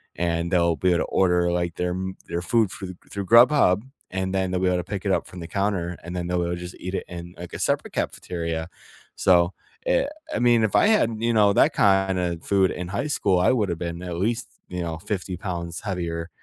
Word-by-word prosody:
And 85 0 -1
they'll 85 -2 +3
be 90 +6 +2
able 85 - +3
to - - +1
order 90 -2 +2
like 85 -1 -1
their 90 0 -1
m 95 +1 -4
their 85 - -2
food 110 +2 +2
through 95 -2 -7 0.2
through 100 -1 -4
Grubhub, 115 -3 +6 0.3
and 95 0 -1
then 95 -1 0
they'll 90 - 0
be 95 - +1
able 90 - +2
to 90 - -2
pick 100 +2 -5
it 100 - +2
up - - 0
from 90 - -10
the 85 - -6
counter, 90 -2 -1
and 85 +1 -7
then 90 -1 -3
they'll 90 -1 0
just 90 0 -8
eat 90 +1 -5
it - - -3
in, 85 0 -8
like, 90 0 -9
a - - -5
separate - - 0
cafeteria. 85 -2 -3 0.5
So, 90 -1 +4 0.3
eh, - - +2 0.3
I - - 0
mean, 120 -2 +4
if 105 - -2
I - - +5
had, 210 - +3
you 115 +1 +1
know, 105 -2 +5
that - - +4
kinda 95 -3 +2
food 95 -2 +2
in 90 0 -5
high 105 +9 -2
school, 100 -11 +2
I 90 - +4
would've 100 -8 0
been 85 0 -4
at 90 -2 -4
least, 115 +6 -1 0.2
you 90 0 -4
know, 85 -2 -3
50 90 -1 -4
pounds 85 -2 -4
heavier, 85 -4 -3
90 Hz, 225 wpm, -24 LUFS, 85-100 Hz, 0.5 s, Grubhub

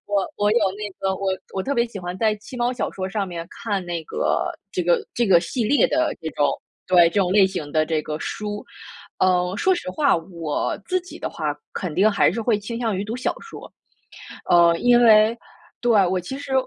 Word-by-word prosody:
我 200 -2 0
我 205 0 +2
有 235 - +4 0.2
那 210 -1 -4
个 190 0 0
我 190 0 -1 0.2
我 190 - -1
特 280 +5 -2
别 235 0 +2
喜 220 -4 -8
欢 180 0 -5
在 215 0 +2
七 215 +4 -11
猫 245 +1 0
小 250 - -3
说 185 -1 -4
上 200 0 -2
面 170 -2 -6
看 200 -4 -3
那 170 -2 -4
个 - - -1 0.3
这 180 - -1
个 175 0 +2
这 240 -1 +1
个 175 -3 +6
系 230 +6 -2
列 285 +6 +4
的 315 0 +1
这 160 - -4
种 145 -1 +1 0.4
对， 175 -2 +6
这 - - -17
种 185 -2 +1
类 195 -1 +6
型 155 -6 -5
的 155 -1 +2
这 155 -1 -1
个 150 0 -5
书。 210 +4 -5 0.5
嗯， 180 0 +2
说 375 - +3
实 340 - -5
话， 280 +4 +2
我 165 -3 -3
自 370 0 0
己 360 - -12
的 - - -3
话 - - -3 0.2
肯 180 -4 -3
定 195 +7 +4
还 205 - +3
是 230 +7 -3
会 225 -1 +2
倾 230 +3 -6
向 225 -5 -1
于 200 - -2
读 225 +3 -4
小 255 - -1
说。 455 - -11 0.8
嗯， 170 -1 +5
因 245 0 +5
为 220 0 +6 0.4
对， 240 - +2 0.2
我 185 - 0
其 180 +10 -6
实 280 -1 -6
200 Hz, 240 characters per minute, -22 LUFS, 175-235 Hz, 0.8 s, 个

